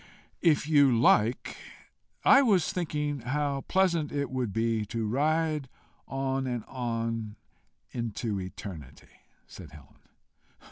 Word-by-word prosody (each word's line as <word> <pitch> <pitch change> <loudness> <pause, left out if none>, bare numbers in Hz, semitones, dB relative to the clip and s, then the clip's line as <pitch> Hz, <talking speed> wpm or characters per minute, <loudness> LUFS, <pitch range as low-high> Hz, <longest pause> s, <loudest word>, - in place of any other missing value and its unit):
"If 155 -4 +3
you 145 -4 +5
like. 115 0 +3 0.7
I 275 - +8
was 195 - +2
thinking 150 -5 -2
how 140 +3 -1
pleasant 170 -5 +2
it 140 -2 -2
would 125 -5 -2
be 115 0 0
to 115 +1 -3
ride 150 +3 0 0.4
on 135 0 -2
and 120 -3 -3
on 115 -3 -3 0.6
into 115 -3 -3
eternity," 90 -6 -10 0.3
said - - -12
Helen. 75 -4 -16
130 Hz, 110 wpm, -28 LUFS, 115-150 Hz, 0.7 s, I